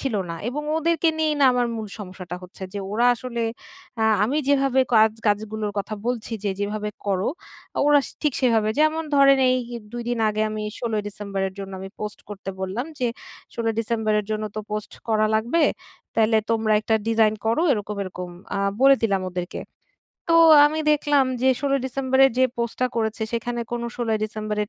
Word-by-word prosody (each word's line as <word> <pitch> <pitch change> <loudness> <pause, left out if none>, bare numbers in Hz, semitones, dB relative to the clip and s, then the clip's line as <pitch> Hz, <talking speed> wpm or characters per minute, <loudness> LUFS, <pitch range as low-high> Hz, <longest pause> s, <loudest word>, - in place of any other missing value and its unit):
ছিল 270 -5 -2 0.2
না। - - -3
এবং 295 +4 -3 0.2
ওদেরকে 330 0 +2
নিয়েই 310 -1 +2
না - - +6
আমার 245 -1 +1
মূল 220 -1 -4
সমস্যাটা 185 -3 -7
হচ্ছে, 180 +1 -12
যে - - -2
ওরা 235 +3 +3
আসলে 235 -1 -4 0.6
আ - - +4 0.2
আমি 270 +7 -1
যেভাবে 270 -2 +3
কা 220 - +7 0.3
কাজগুলোর 210 0 -1
কথা 205 +2 -3
বলছি 240 -2 -2
যে 200 - +1
যেভাবে 210 +1 -2 0.2
করো, 195 0 0 0.6
ওরা 295 -1 +6 0.2
ঠিক 300 -2 +2
সেভাবে 225 -4 +3
যেমন 310 +1 +2
ধরেন 275 -1 +6 0.5
২ 240 - -4
দিন 240 -1 -1
আগে 215 0 0
আমি 215 0 -4 0.2
১৬ 235 -2 -3
ই - - -10
ডিসেম্বরের 195 -2 -4
জন্য 195 -1 -6
আমি 195 - -7
পোস্ট 210 -1 -5
করতে 195 -2 -6
বললাম 190 +6 -2
যে 250 - +1 0.5
১৬ 230 -1 -3
ই - - -1
ডিসেম্বরের 215 -2 0
জন্য 215 0 -1
তো - - -1
পোস্ট 210 0 -4 0.2
করা 215 -1 +3
লাগবে। 235 +10 +2 0.5
তাইলে 220 0 +4
তোমরা 220 -1 +1
একটা 220 +1 0
ডিজাইন 220 -1 +3
করো 230 +9 +2
এরকম, 210 -3 -3
এরকম, 180 -2 -6 0.2
আ - - -1 0.2
বলে 275 0 +7
দিলাম 195 -4 +1
ওদেরকে। 180 +1 -5 0.7
তো - - +5 0.3
আমি 310 +1 -2
দেখলাম 290 -2 +3 0.2
যে 265 - +4
১৬ 280 0 0
ই - - -6
ডিসেম্বরের 265 +1 +3
যে 260 - +6
পোস্টটা 235 +2 -1
করেছে 220 -1 -1
সেখানে 240 +1 -2
কোনো 235 0 -2
১৬ 240 -2 -3
ই - - -5
ডিসেম্বরের 215 -1 -3
225 Hz, 180 wpm, -23 LUFS, 210-260 Hz, 0.7 s, কা